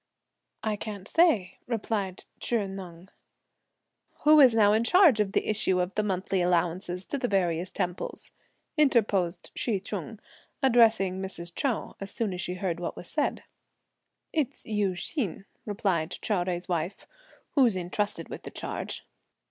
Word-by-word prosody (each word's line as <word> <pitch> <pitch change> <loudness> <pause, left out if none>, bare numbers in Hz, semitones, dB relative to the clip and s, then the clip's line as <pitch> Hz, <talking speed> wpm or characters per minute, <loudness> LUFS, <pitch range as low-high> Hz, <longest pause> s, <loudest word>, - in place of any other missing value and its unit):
"I 215 -1 0
can't 205 -2 -6
say," 235 - +3
replied 210 -5 -2
Chih 230 -4 0
Neng. 185 -2 -9 1.1
"Who's 295 -6 +7
now 210 -2 +5
in 220 +2 +3
charge 330 - +6
of 205 -1 +1
the - - +1
issue 195 -3 +2
of 180 +1 -1
the 215 - +1
monthly 190 -2 -1
allowances 175 +1 0
to 280 - -3
the 245 - 0
various 180 -4 +1
temples?" 180 -2 -4 0.5
interposed 200 - +2
Hsi 215 -5 0
Ch'un, 205 +2 -6 0.4
addressing 225 -7 +4
Mrs. 175 -3 -5
Chou, 260 0 -1
as 195 - -5
soon 210 -2 -2
as 180 - -4
she 180 - -3
heard 180 -2 -2
what 175 - -4
was 175 - -9
said. 295 - -1 0.9
"It's 300 -6 -1
Yü 210 -3 0
Hsin," 200 - -3 0.2
replied 185 -5 0
Chou 215 - 0
Jui's 175 -1 -1
wife, 175 +1 -2 0.5
"who's 250 -8 +4
intrusted 185 +3 -2
with - - -7
the - - -8
charge." - - -5
195 Hz, 145 wpm, -28 LUFS, 180-225 Hz, 1.1 s, Who's